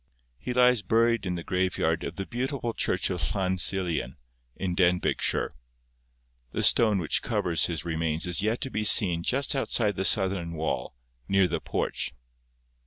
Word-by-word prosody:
He 95 - -5
lies 125 -2 +4
buried 115 -1 +1
in 90 - -2
the 85 - -6
graveyard 90 -3 -1
of - - -6
the 95 - -5
beautiful 125 0 -3
church 90 -2 -1
of 90 -2 -3
Llan 95 -1 -1
Silien, 85 -9 0 0.4
in 95 -2 -3
Denbigshire. 90 0 +1 1.0
The - - -1
stone 110 -4 +5
which 85 -5 -1
covers 85 -3 0
his 85 -1 -4
remains 80 -1 -1
is 90 0 +3
yet 110 +3 -1
to 135 - -4
be 110 - -2
seen 95 -6 +5
just 135 +10 0
outside 115 -6 0
the 95 - -2
southern 95 -4 +2
wall, 80 -5 -4 0.3
near 95 -1 +3
the - - -3
porch. - - -3
95 Hz, 160 wpm, -26 LUFS, 85-110 Hz, 1.0 s, stone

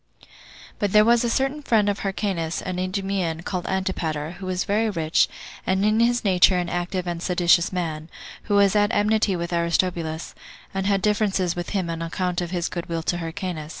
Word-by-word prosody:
3. - - -20 0.5
But 205 -2 0
there 210 0 +7
was 235 +1 +4
a 235 - +1
certain 270 +5 0
friend 220 -7 +2
of 200 -1 0
Hyrcanus, 190 -5 -2
an 185 -1 -3
Idumean, 185 -3 -2
called 180 -2 -3
Antipater, 165 -5 -2
who 190 - -6
was 185 0 -1
very 215 +2 +1
rich, 165 -5 +2 0.4
and 190 +2 +2
in 215 +1 +3
his 240 +1 +2
nature 185 -2 +5
an 175 -1 -1
active 180 +1 -2
and 170 -1 -3
a - - -6
seditious 175 -1 +3
man; 160 -3 -3 0.4
who 205 - +1
was 200 0 +4
at 205 +1 +3
enmity 210 -1 +2
with 170 0 -4
Aristobulus, 170 -1 -1 0.4
and 195 0 -1
had 195 -1 +1
differences 200 -4 +1
with 175 0 -4
him 190 -4 -1
on 165 0 -4
account 180 +1 -2
of 175 - -3
his 175 -1 -1
good 175 -1 -5
will 165 -1 -2
to 175 +1 -1
Hyrcanus. 165 -2 -5
185 Hz, 200 wpm, -24 LUFS, 170-205 Hz, 0.5 s, there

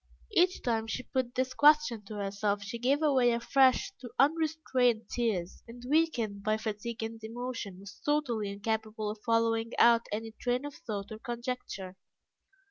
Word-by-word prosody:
Each 365 -1 +3
time 225 -2 0
she 255 +3 -3
put 255 -1 -2
this 255 0 0
question 295 -6 +4
to 215 - -8
herself 200 0 -1
she 230 +3 -6
gave 270 +5 +2
way 260 -5 +4
afresh 260 +8 +3
to 245 - -7
unrestrained 280 -6 +2
tears, 205 -8 -1
and, 240 +1 -11
weakened 250 -10 +1
by 215 +1 +1
fatigue 220 +1 -4
and 225 0 -6
emotion, 230 -4 -5
was 200 +1 -12
totally 250 -9 0
incapable 215 +1 -2
of 210 0 -10
following 230 -1 +1
out 235 0 +5
any 225 +2 -3
train 245 +4 -2
of 290 - -6
thought 205 -5 -6
or 215 - -7
conjecture. 235 -6 -5
230 Hz, 155 wpm, -30 LUFS, 215-255 Hz, -, out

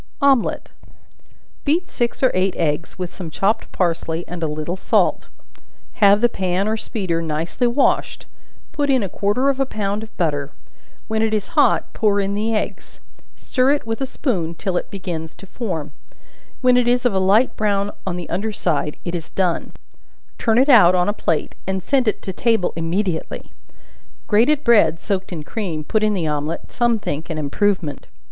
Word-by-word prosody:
Omelet. 275 -4 +2 0.9
Beat 335 +5 +1
six 240 +1 -2
or 260 - +5
eight 185 +1 +1
eggs, 155 -1 -1
with 180 -2 -5
some 180 -4 -7
chopped 205 +7 0
parsley 165 -1 -1
and 175 0 -6
a 160 - 0
little 155 +3 -3
salt; 190 - +1 0.7
have 205 +1 +6
the 240 - +6
pan 190 -2 -1
or 220 - +1
speeder 190 -7 -2
nicely 165 +9 -1
washed; 240 +4 +1 0.5
put 290 -2 -1
in 260 -5 +3
a - - -1
quarter 205 +9 0
of 275 -1 +1
a 270 - +3
pound 205 -3 -2
of 220 - -11
butter, 145 -5 -1 0.5
when 220 0 0
it 220 -1 +1
is 210 - -3
hot, - - +2
pour 205 -2 +2
in 200 0 0
the 215 +2 -1
eggs; 215 - -4 0.4
stir 260 +2 +1
it 290 - -2
with 225 +3 -3
a 270 - -1
spoon 180 - -2
till 185 +2 -3
it - - -2
begins 170 -5 -5
to - - -13
form; 180 -8 -4 0.7
when 250 -1 +5
it 245 -1 +2
is 245 +1 +2
of 245 - +3
a 190 - +2
light 200 +7 +3
brown 205 -1 0 0.2
on 180 - -1
the 175 -2 -5
under 215 +4 -2
side 155 -7 -1
it 175 - -3
is 170 -3 -5
done; 180 -3 -1 0.7
turn 225 -1 +2
it 260 +3 +5
out 205 -10 +7
on 180 +2 +2
a - - +1
plate, 165 -6 -1
and 190 -1 -2
send 265 -1 +1
to 200 -2 -1
table 225 -2 +1
immediately. 165 +1 -2 0.7
Grated 265 +8 +3
bread, 170 -9 +4
soaked 190 -1 -3
in 160 -4 -5
cream, 170 -4 -4
put 215 +8 0
in 215 -1 +2
the 175 -4 -1
omelet, 150 +1 -3
some 240 -1 +2
think 160 -6 -4
an 160 - -3
improvement. 155 0 -1
195 Hz, 180 wpm, -21 LUFS, 170-225 Hz, 0.9 s, out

